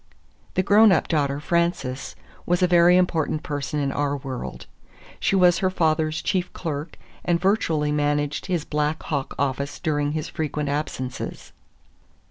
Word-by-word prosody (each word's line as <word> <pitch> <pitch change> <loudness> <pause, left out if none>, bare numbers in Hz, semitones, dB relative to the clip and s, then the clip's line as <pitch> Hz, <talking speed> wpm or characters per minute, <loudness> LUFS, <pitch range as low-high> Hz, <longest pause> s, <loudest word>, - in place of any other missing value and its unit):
The 185 - +2
grown 210 +2 +6
up 180 - +2
daughter, 140 -3 0
Frances, 170 -5 -1 0.3
was 175 +1 +2
a - - +5
very 175 0 +6
important 165 -4 +1
person 145 0 -3
in 140 -1 0
our 145 0 -1
world. 130 - -6 0.5
She - - +1
was 180 -2 +5
her 185 - +2
father's 160 -3 0
chief 185 -3 -1
clerk, 155 -2 -5 0.3
and 170 -1 +1
virtually 165 -6 +1
managed 145 0 0
his 175 -4 -1
Black 150 +1 -1
Hawk 140 -4 -3
office 140 +1 -2
during 145 -2 0
his 155 -1 -3
frequent 150 -2 -3
absences. 140 -3 -4
155 Hz, 145 wpm, -24 LUFS, 145-175 Hz, 0.5 s, grown